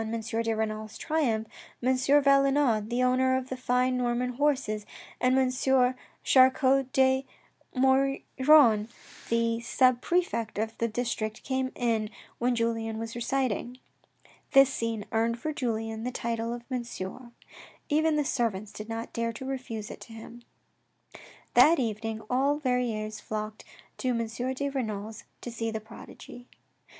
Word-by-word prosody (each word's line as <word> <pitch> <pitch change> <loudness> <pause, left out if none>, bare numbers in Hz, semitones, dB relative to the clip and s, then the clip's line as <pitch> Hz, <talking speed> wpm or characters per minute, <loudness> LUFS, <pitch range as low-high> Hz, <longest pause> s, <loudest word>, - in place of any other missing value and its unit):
de 225 0 -2
Renal's 215 0 -3
triumph, 260 -9 0 0.4
M. 260 +1 +3
Valenod, 275 -4 +3
the 245 +1 +1
owner 260 +1 +3
of 260 0 -5
the 260 - -3
fine 255 0 +1
Norman 245 0 0
horses, 255 -6 0 0.4
and 255 +1 +3
M. 255 0 +3 0.3
Char 260 -1 +7
cot 265 0 +1
de 265 0 +3 0.5
Maugiron, 265 -2 +4 0.4
the 230 0 +1
sub 250 +1 +3
prefect 340 - -1
of 220 +1 -2
the 230 - +1
district 220 -2 -3
came 260 -1 -1
in 225 -3 0 0.3
when 245 +1 +1
Julien 225 -1 -1
was 225 0 -5
reciting. 245 0 -2 0.8
This 270 -1 +6
scene 225 -3 -3
earned 230 +1 +1
for 310 +5 -3
Julien 225 -4 -3
the 250 - -1
title 230 -1 -2
of 240 0 -5
Monsieur; 240 -1 -5 0.6
even 310 +1 +2
tht 295 - +1
servants 215 -6 -1
did 215 +1 -9
not 225 0 -5
dare 230 0 -1
to 245 +4 -8
refuse 250 -5 -5
it - - -10
to 230 - -11
him. 225 +2 -11 1.1
That 330 +2 +7
evening 225 -2 -3
all 275 +4 +2
Verrieres 235 -6 -1
flocked 215 0 -5 0.3
to 255 - -2
M. 230 -2 +1 0.3
de 280 +2 -2
Renal's 220 -5 -4 0.2
to 240 - -6
see 225 0 -3
the 220 0 -3
prodigy. 230 +2 -12
240 Hz, 140 wpm, -28 LUFS, 225-260 Hz, 1.1 s, Char